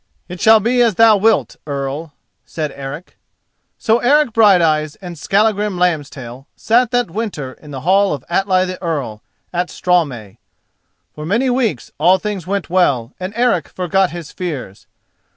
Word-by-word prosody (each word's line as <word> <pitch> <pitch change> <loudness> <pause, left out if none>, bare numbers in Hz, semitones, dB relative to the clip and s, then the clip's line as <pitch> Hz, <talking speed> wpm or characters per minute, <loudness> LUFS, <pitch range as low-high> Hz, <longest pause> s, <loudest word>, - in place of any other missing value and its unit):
"It 180 -1 -8
shall 220 0 +7
be 240 +4 +1
as 230 -5 +3
thou 225 +1 +6
wilt, 220 +2 +1
Earl," 140 +2 -4 0.3
said 155 -3 -4
Eric. 140 +5 -8 0.6
So 225 +1 +2
Eric 280 0 +3
Brighteyes 165 -9 +3
and 180 -3 -8
Skallagrim 205 +3 0
Lambstail 140 -7 -2
sat 240 +1 +2
that 245 -6 0
winter 175 - -4
in 150 - -16
the 135 -2 -7
hall 195 +4 +3
of 140 -4 -5
Atli 185 +1 +1
the 185 0 -6
Earl 140 - -3 0.3
at 175 0 -1
Straumey. 140 - -1 0.7
For 150 - -8
many 230 +10 +1
weeks 230 - -1
all 185 +2 +5
things 195 -3 -5
went 200 -1 -2
well 140 -9 +1
and 185 +1 -4
Eric 245 0 +1
forgot 185 +1 0
his 170 -3 -8
fears. 145 - -6
180 Hz, 150 wpm, -17 LUFS, 150-210 Hz, 0.7 s, shall